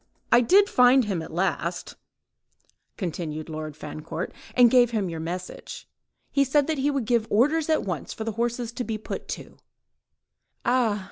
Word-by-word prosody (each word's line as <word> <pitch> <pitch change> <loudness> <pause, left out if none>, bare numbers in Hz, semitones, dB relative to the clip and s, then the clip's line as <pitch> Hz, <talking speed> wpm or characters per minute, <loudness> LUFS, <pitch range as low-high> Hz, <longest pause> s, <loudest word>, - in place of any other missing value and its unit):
"I 240 - +7
did 390 - +5
find 250 - +5
him 190 -5 -2
at 160 - -8
last," 175 0 -2 1.0
continued 160 -4 -4
Lord 155 -1 -6
Fancourt, 155 +3 -6 0.2
"and 245 -2 +6
gave 245 -2 +5
him 210 -6 -1
your 165 - -5
message. 180 +3 -6 0.4
He 280 - +3
said 275 +1 +2
that 315 -2 -2
he 280 +2 +2
would 275 -5 -1
give 230 -1 +1
orders 295 +8 +2
at 315 - +2
once 180 -6 -4
for 220 - -5
the 225 - -2
horses 235 +1 -2
to 245 - -4
be 225 -2 -3
put 215 - -6
to." - - -7 1.1
"Ah!" 240 -4 +2
225 Hz, 165 wpm, -25 LUFS, 175-250 Hz, 1.1 s, I